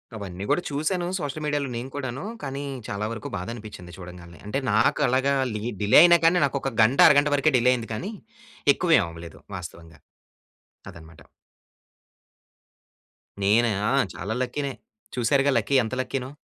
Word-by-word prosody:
అవన్నీ 95 -3 -7
కూడా - - +2
చూసాను. 165 +5 -1
సోషల్ 150 0 -5
మీడియాలో 145 -2 -1
నేను 125 +3 -6
కూడాను. 135 -1 -5 0.2
కానీ, 135 0 -4 0.2
చాలా 105 +1 -3
వరకు 110 -2 -7
బాధ 90 0 -6
అనిపించింది 105 -6 -11
చూడంగానే. 90 -2 -11
అంటే 105 +7 -2
నాకు 110 +2 +2
అలాగా 135 +2 +1 0.2
లి 105 -1 -5 0.2
డిలే 105 0 +6
అయినా 175 0 +6
కానీ 170 +2 +5
నాకు 140 - -2
ఒక 135 - -2
గంట, 115 +5 +3
అరగంట 145 +1 +4
వరకే 145 +1 +2
డిలే 125 +1 +3
అయింది 120 -2 -4
కానీ, 185 - -5 0.6
ఎక్కువ 180 - -3
ఏమి 100 - +2
అవ్వలేదు 85 -1 -11 0.2
వాస్తవంగా. 85 -3 -11 0.9
అదనమాట. 80 -1 -14 2.2
నేనా 115 +4 +3 0.2
ఆ! - - +1 0.2
చాలా 100 +5 -4
లక్కీ‌నే. 135 +2 -3 0.4
చూసారుగా 135 +3 +2
లక్కీ, 140 - 0
ఎంత 110 - -5
లక్కీనో. 130 0 -4
120 Hz, 150 wpm, -24 LUFS, 100-140 Hz, 2.2 s, డిలే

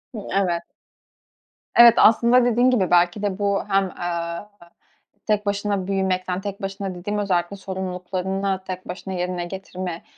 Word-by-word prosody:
Hı, - - -4
evet. 180 -3 +1 1.2
Evet, 235 -1 +9
aslında 235 +3 +5
dediğin 245 +1 +3
gibi 205 -8 +1
belki 175 +3 +3
de 200 -2 -2
bu 200 -1 +1
hem, 195 -1 +2
aaa, 170 +2 -4 0.8
tek 210 -1 0
başına 200 -1 -1
büyümekten, 185 -1 -1
tek 200 0 -6
başına 195 -1 -4
dediğim 205 +4 -4
özellikle 190 -2 0
sorumluluklarını 190 0 -3
tek 185 0 -6
başına 190 +1 -6
yerine 180 -1 -2
getirme, 185 -1 -6
190 Hz, 135 wpm, -23 LUFS, 180-205 Hz, 1.2 s, Evet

